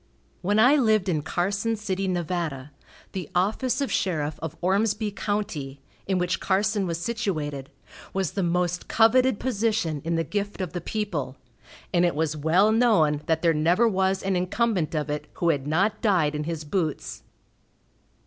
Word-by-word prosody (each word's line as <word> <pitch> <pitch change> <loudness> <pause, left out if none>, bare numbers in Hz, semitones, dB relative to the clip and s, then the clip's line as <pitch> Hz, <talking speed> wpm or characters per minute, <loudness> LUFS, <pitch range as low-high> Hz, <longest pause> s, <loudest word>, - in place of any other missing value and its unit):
When 205 +3 +1
I 250 +7 +6
lived 215 -7 +2
in 155 -4 +1
Carson 200 +8 -1
City, 195 -2 -2
Nev., 175 -3 -1 0.8
the 185 -5 -5
office 235 +8 +1
of 275 - -1
sheriff 155 -5 -1
of 160 -2 -5
Ormsby 205 +3 +1
county, 185 -10 -3 0.3
in 190 -1 +1
which 180 0 0
Carson 200 0 +1
was 165 -1 -2
situated, 160 - -3 0.4
was 190 -4 -1
the 200 - -2
most 180 0 0
coveted 240 +1 +4
position 215 - 0
in 165 +1 -1
the 165 - +1
gift 205 +3 -3
of 185 -3 -4
the 175 - -3
people, 165 -11 -3 0.6
and 175 -1 +4
it 175 -3 +2
was 155 0 0
well 170 +8 +3
known 205 -11 +3
that 160 0 +1
there 165 -1 +4
never 170 +9 +3
was 190 -2 +1
an 195 0 0
incumbent 180 -2 0
of 150 -1 -1
it 150 - -4
who 170 - 0
had 145 -3 0
not 195 +8 +1
died 180 -9 +2
in 150 0 -3
his 160 -1 -4
boots. 155 0 -3
185 Hz, 165 wpm, -25 LUFS, 160-210 Hz, 0.8 s, I